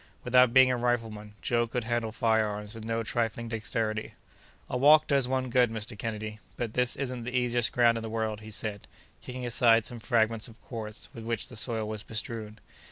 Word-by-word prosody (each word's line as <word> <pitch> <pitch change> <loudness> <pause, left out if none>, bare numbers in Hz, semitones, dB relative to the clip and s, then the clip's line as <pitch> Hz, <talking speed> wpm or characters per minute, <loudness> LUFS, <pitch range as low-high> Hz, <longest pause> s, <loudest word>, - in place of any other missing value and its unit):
Without 125 -1 +5
being 130 +1 +6
a 125 - 0
rifleman, 115 -4 -2
Joe 120 -1 +1
could 120 +1 -2
handle 115 -1 -1
fire 110 -2 +2
arms 105 +1 -5
with 115 -1 -9
no 115 +1 -1
trifling 115 0 -1
dexterity. 110 -1 -2 0.5
"A - - -4
walk 150 +4 +6
does 140 -3 +3
one 130 -1 -1
good, 125 -1 +4
Mr. 110 0 -5
Kennedy, 110 0 -5 0.2
but 115 -2 -3
this 125 -1 +2
isn't 125 -3 -4
the 125 +2 -2
easiest 120 -3 +2
ground 115 -2 +4
in - - -7
the 110 - -5
world," 110 -1 -2
he 110 - -10
said, 105 -1 -4 0.3
kicking 125 0 -6
aside 115 -1 +4
some 120 - -6
fragments 110 -1 +1
of 115 0 -15
quartz 110 -3 -6
with 115 - -8
which 115 -1 -3
the - - -10
soil 110 0 -2
was 110 -1 -4
bestrewn. 110 -1 -4
115 Hz, 200 wpm, -29 LUFS, 110-120 Hz, 0.5 s, being